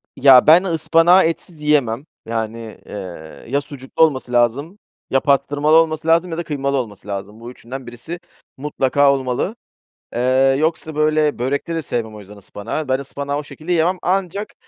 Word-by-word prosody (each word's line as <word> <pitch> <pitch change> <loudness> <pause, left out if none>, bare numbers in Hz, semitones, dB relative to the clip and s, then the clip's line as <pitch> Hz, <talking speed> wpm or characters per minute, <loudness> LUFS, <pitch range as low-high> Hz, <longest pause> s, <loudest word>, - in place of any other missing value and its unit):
Ya 130 0 +6
ben 165 +4 +7
ıspanağı 170 +1 +4
etsiz 165 -1 -3
yiyemem, 140 -3 +1 0.2
yani, 115 -1 -5
eee, 90 -6 -9
ya 140 +4 0
sucuklu 140 +1 -2
olması 130 -5 0
lazım, 135 - 0 0.3
ya 135 - +3
pastırmalı 145 +2 +2
olması 160 -1 +2
lazım 165 +2 +3
ya 165 - -4
da 170 - -2
kıymalı 140 -2 -2
olması 105 -6 -6
lazım. 100 +2 -6
Bu 120 +1 -9
üçünden 125 +1 -9
birisi 125 +9 -8 0.4
mutlaka 140 0 +2
olmalı, 135 - -2 0.6
eee, 130 +2 +3
yoksa, 160 0 -1
böyle, 155 -1 +1
börekte 140 +6 -2
de 165 - -1
sevmem 115 -5 -4
o - - -9
yüzden 105 +1 -13
ıspanağı, 105 +9 -6
ben 130 +1 +1
ıspanağı 140 +1 -4
o 150 - -4
şekilde 155 +4 -8
yemem 175 +3 +2
ancak 195 +2 -2
140 Hz, 165 wpm, -19 LUFS, 120-160 Hz, 0.6 s, ben